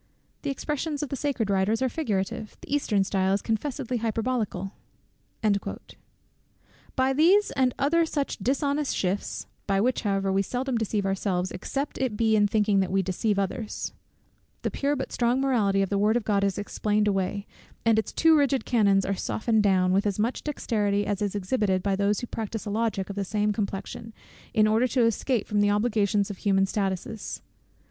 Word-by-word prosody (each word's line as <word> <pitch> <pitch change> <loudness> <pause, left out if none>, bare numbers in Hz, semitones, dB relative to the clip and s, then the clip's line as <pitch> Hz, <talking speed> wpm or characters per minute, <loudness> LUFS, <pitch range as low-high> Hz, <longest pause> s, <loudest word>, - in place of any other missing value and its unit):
The 285 - -3
expressions 295 +1 -2
of 290 - -4
the 275 - -2
sacred 260 -7 -1
Writers 195 +3 +2
are 260 - +2
figurative; 225 -5 -3
the - - -6
Eastern 210 -9 +2
style 190 0 +1
is 200 - +1
confessedly 250 +2 -2
hyperbolical." 220 -4 -2 2.2
By 265 0 +2
these 360 +9 +4
and 255 -2 +1
other 335 +4 +3
such 285 -3 -2
dishonest 280 +2 0
shifts 190 +2 -2 0.2
(by 195 -1 +2
which 250 +5 +1
however 195 -2 0
we 195 - +3
seldom 250 +6 -2
deceive 215 -3 -1
ourselves, 190 -1 -1
except 275 +9 -4
it 250 -5 -1
be 220 -1 +3
in 205 -1 +4
thinking 210 -1 +2
that 190 -1 +1
we 195 0 +2
deceive 195 +3 0
others) 200 +3 -3 0.7
the - - -1
pure 285 +1 0
but 265 - -4
strong 240 +1 +1
morality 215 -8 +2
of 195 - -2
the 200 - +1
word 215 +3 +3
of 240 - -2
God 200 -2 +2
is 200 -2 0
explained 210 +1 0
away, 195 0 -1 0.4
and 225 -1 +4
its 220 - -3
too 325 -1 +5
rigid 280 -3 +2
canons 200 -5 +3
are 195 - 0
softened 220 +3 0
down, 185 -2 +3
with 200 +2 +2
as 200 - -1
much 225 +4 -1
dexterity 205 -8 0
as 205 0 -2
is 205 -1 -1
exhibited 195 -2 0
by 200 -1 +1
those 200 +1 +1
who - - -3
practise 225 -2 -5
a 205 - -3
logic 205 -3 -1
of - - -7
the 200 - -1
same 210 +1 0
complexion, 210 +2 -4 0.4
in 215 -2 +4
order 220 +4 +3
to 255 0 +1
escape 230 0 +1
from 210 -1 +1
the 205 - +3
obligations 205 -1 +1
of 200 - -8
human 195 -1 +2
statutes. 195 +2 -3
210 Hz, 185 wpm, -26 LUFS, 195-250 Hz, 2.2 s, too